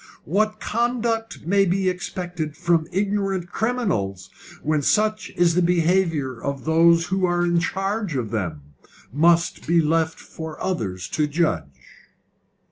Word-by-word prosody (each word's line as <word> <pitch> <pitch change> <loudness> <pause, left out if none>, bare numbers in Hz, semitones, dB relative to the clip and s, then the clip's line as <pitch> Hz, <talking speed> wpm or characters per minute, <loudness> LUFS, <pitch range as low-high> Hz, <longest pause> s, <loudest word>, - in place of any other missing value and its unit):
What 215 +6 0
conduct 230 -3 -1
may 195 +3 +3
be 190 +1 +1
expected 175 -3 -4
from 170 -2 +1
ignorant 195 -2 -1
criminals 110 - -1 0.3
when 155 0 +1
such 215 +6 +1
is 175 -1 +4
the 180 - +2
behaviour 170 -7 +1
of 140 -2 -4
those 165 +1 +4
who 190 0 0
are 175 0 +1
in 175 -1 +2
charge 195 +1 -2
of 115 -5 -2
them, 90 -10 -3 0.5
must 170 +4 +2
be 170 +1 +4
left 160 +1 +1
for 160 -1 -8
others 95 - -3
to 150 -1 0
judge." 80 - -2
170 Hz, 130 wpm, -23 LUFS, 150-195 Hz, 0.5 s, is